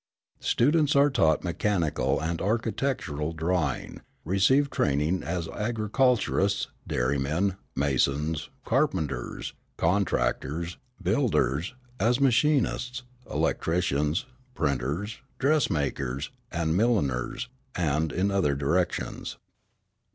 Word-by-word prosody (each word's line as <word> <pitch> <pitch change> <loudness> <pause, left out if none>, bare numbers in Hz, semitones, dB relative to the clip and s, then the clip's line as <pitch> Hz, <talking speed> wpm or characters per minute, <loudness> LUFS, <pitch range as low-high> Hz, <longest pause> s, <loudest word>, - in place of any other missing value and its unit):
Students 145 +3 +3
are 140 +1 +5
taught 80 -12 +3
mechanical 85 -2 0
and 80 +1 -2
architectural 110 - -1
drawing, 80 -3 -1 0.2
receive 130 - +3
training 75 +6 +1
as 85 -1 -3
agriculturists, 110 -2 +1 0.2
dairymen, 70 +9 0 0.2
masons, 70 +3 0 0.2
carpenters, 90 - -1 0.2
contractors, 85 -2 0 0.2
builders, 75 - +1 0.2
as 120 +3 +3
machinists, 130 -1 +2 0.3
electricians, 80 - 0 0.3
printers, 75 - -1 0.2
dressmakers, 75 - 0 0.2
and 80 -1 0
milliners, 110 - +1 0.3
and 80 -2 +1
in 95 +5 +1
other 90 -8 +2
directions. 85 +6 -1
85 Hz, 80 wpm, -27 LUFS, 75-115 Hz, 0.3 s, are